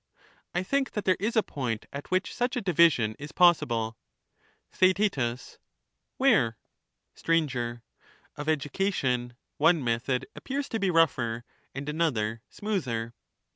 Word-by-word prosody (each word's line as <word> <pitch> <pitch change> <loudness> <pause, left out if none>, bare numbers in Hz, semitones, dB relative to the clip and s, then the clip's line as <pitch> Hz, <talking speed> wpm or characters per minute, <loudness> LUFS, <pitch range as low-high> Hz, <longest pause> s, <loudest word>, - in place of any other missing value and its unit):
I 180 - +1
think 275 +7 0
that 210 - -3
there 185 - +4
is 215 +5 -1
a 220 - +4
point 120 -6 -3
at 140 +1 -7
which 185 +1 0
such 245 +2 -1
a 245 - -1
division 165 - +3
is 150 +2 -7
possible. 120 -11 +3 0.7
Theaet. 190 +2 +3 1.0
Where? 205 - +3 0.6
Sir. 125 -8 -1 0.5
Of 145 +2 -4
education, 135 -6 0 0.2
one 160 0 +4
method 125 +2 0
appears 275 +1 -3
to 225 - -2
be 195 - +1
rougher, 130 -9 +2 0.3
and 140 +2 -5
another 120 -9 0
smoother. 125 - -3
150 Hz, 125 wpm, -28 LUFS, 120-190 Hz, 1.0 s, there